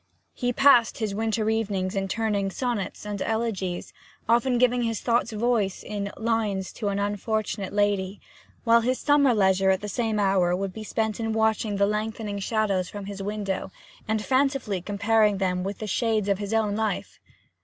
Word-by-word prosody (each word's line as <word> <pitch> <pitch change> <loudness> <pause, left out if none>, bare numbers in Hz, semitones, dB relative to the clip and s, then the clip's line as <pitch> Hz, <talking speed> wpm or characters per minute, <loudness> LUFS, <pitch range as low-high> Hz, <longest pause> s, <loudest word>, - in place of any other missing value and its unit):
He 245 0 -1
passed 245 -3 +5
his 215 -3 -2
winter 220 0 -1
evenings 205 -3 -1
in 195 0 -1
turning 205 -1 0
sonnets 220 -3 -3
and 205 -2 -4
elegies, 220 -6 -2 0.3
often 240 +2 +3
giving 250 0 +3
his 230 -2 -1
thoughts 235 0 +1
voice 215 -3 0
in 200 -1 -4
'Lines 220 -4 -1
to 215 - -4
an 200 0 0
Unfortunate 205 0 -2
Lady,' 205 -1 0 0.4
while 230 0 +5
his 250 +2 0
summer 290 -3 +4
leisure 190 -1 +3
at 190 0 +2
the 210 - -5
same 220 +1 -1
hour 190 -3 +3
would 195 0 -3
be 220 - -7
spent 220 0 -2
in 225 -1 -1
watching 220 -1 +1
the 200 0 +3
lengthening 210 0 -2
shadows 200 -3 0
from 205 -1 -7
his 200 0 -6
window, 195 -2 -3 0.4
and 220 -1 -1
fancifully 260 -8 +1
comparing 210 +1 +2
them 180 -2 0
with 195 +1 -4
the 215 - -5
shades 215 0 0
of 200 -1 +1
his 205 0 -4
own 220 -2 +1
life. 215 -2 -2
210 Hz, 175 wpm, -26 LUFS, 195-225 Hz, 0.4 s, passed